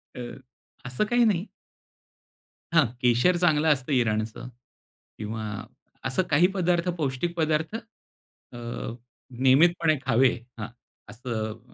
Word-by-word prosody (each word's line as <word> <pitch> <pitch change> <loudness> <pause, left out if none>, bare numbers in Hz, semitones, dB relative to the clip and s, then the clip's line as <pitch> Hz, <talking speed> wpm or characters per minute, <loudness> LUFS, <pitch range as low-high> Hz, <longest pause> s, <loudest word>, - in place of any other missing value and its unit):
अ, - - -7 0.7
असं 125 +9 -1
काही 240 0 +4
नाही. 195 -4 +1 1.3
हां. 165 -3 +5 0.2
केशर 125 +9 +4
चांगलं 160 -3 +3
असतं 130 0 -5
इराणचं 110 -2 0 0.7
किंवा 110 +1 -5 0.6
असं 135 +8 +1
काही 155 +5 +5
पदार्थ 180 -1 +1
पौष्टिक 155 +3 -2
पदार्थ 160 +4 0
अ, 225 - -14 0.8
नियमितपणे 155 +4 +4
खावे 130 0 +4 0.3
हां. 105 - -4 0.4
असं 110 -1 -4
145 Hz, 100 wpm, -26 LUFS, 120-175 Hz, 1.3 s, हां